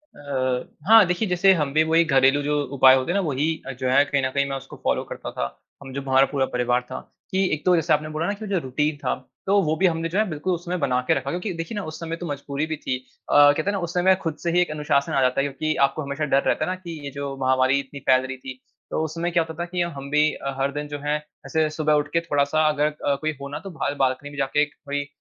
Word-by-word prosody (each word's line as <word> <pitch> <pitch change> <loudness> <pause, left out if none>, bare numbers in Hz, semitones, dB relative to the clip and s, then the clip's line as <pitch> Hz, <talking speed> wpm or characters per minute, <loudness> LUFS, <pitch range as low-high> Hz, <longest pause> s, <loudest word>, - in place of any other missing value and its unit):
अ, 130 -3 -2 0.2
हाँ, 225 -2 +8
देखिए, 180 +5 0
जैसे 180 +2 +4
हम 150 -6 -1
भी 155 +1 +4
वही 165 +1 +5
घरेलू 135 -1 +4
जो 145 0 +1
उपाय 130 -1 +7
होते 130 +5 0
हैं - - -1
ना, - - +3
वही 145 -1 0 0.3
जो 130 -1 0
है, 140 +2 +5
कहीं 140 -1 0
न 130 - +1
कहीं 140 0 +1
मैं 135 - -2
उसको 135 - -11
फ़ॉलो - - +1
करता - - -6
था, - - -3 0.4
हम 135 -1 -9
जो 140 - -3
हमारा 135 0 +4
पूरा 140 -2 +1
परिवार 125 0 +1
था, - - -5 0.3
कि 190 +1 +2
एक 150 - -3
तो 180 -1 +5
जैसे 165 -1 +2
आपने 155 +1 0
बोला 160 +2 -1
ना 205 - 0
कि 210 +1 -8
वो - - -7
जो 195 - +2
रुटीन 150 +4 -1
था, 140 -3 -1 0.3
तो 200 +1 +4
वो 155 -1 +1
भी 190 - +1
हमने 165 0 -1
जो 180 - -2
है, 215 - +3
बिल्कुल 155 +3 -2
उसमें 175 +1 -3
बना 130 -4 +1
के - - +5
रखा 135 -3 -2
क्योंकि 180 +3 -3
देखिए 165 +5 -5
ना, 205 - -3
उस 155 -1 -7
समय 165 0 -4
तो 175 - -7
मजबूरी 140 +1 -3
भी 160 - -2
थी। 130 -3 -2 0.3
अ, - - 0
कहते 145 +1 +6
हैं 200 - 0
ना, 200 - -2
उस 170 - -8
समय 185 +1 +4
खुद 165 -3 -2
से 170 - 0
ही 175 - +3
एक 175 - 0
अनुशासन 150 -2 0
आ 135 - +2
जाता 130 +1 +2
है, 140 - 0
क्योंकि 155 +3 -2
आपको 155 - -4
हमेशा 140 +1 -3
डर 135 - +4
रहता - - +1
है - - -2
ना - - -2
कि 170 -4 -8
ये 140 - -5
जो 140 -1 -5
महामारी 130 +1 +3
इतनी 140 +1 -8
फैल 130 0 +5
रही 130 0 -6
थी, 130 0 -9 0.3
तो - - 0
उस 160 0 -4
समय 170 +1 -1
क्या 170 -1 +3
होता 160 0 -8
था - - -3
कि 180 0 -1
हम 170 - -1
हम 140 0 -7
भी 150 +1 +4
अ, 140 0 -5
हर 135 +1 +1
दिन 150 +1 -4
जो 145 0 -6
है, 150 +1 +1 0.3
ऐसे 160 -1 +1
सुबह 155 -1 +2
उठ - - -14
के 165 - +4
थोड़ा-सा, 155 -1 +1
अगर 150 0 +1 0.2
अ, 140 -1 +2
कोई 155 0 0
हो 140 - -5
ना, 145 - -5
तो 195 - -9
बाहर 145 - -1
बाल्कनी 130 +2 -1
में 145 - -11
जाके 140 +2 +1
एक 150 0 -1
कोई 145 0 -2
अ, - - -15
150 Hz, 295 wpm, -23 LUFS, 140-165 Hz, 0.4 s, हाँ